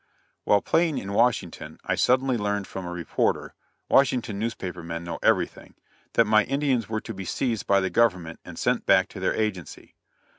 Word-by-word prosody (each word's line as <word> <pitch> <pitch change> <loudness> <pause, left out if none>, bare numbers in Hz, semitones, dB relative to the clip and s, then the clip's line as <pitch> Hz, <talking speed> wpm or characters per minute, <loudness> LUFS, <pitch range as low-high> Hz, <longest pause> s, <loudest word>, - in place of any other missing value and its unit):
] - - -44
While 100 -1 +3
playing 165 -3 +2
in 100 +1 -4
Washington, 115 -6 0
I - - 0
suddenly 130 +1 +2
learned 105 -2 -1
from 95 -2 -7
a - - -5
reporter 90 -2 -1 0.3
Washington 125 -6 +2
newspaper 95 -6 -4
men 85 0 -5
know 85 -1 -5
everything - - 0 0.4
that 115 - +4
my 110 0 +4
Indians 135 -5 0
were 110 -1 -2
to 110 - -7
be 95 -1 -6
seized 115 +4 -2
by 100 0 +4
the 95 - -1
Government 90 -8 +1
and - - -10
sent - - 0
back 95 0 +4
to 100 - -9
their 95 - 0
agency. 100 -7 -4
105 Hz, 185 wpm, -25 LUFS, 95-115 Hz, 0.4 s, that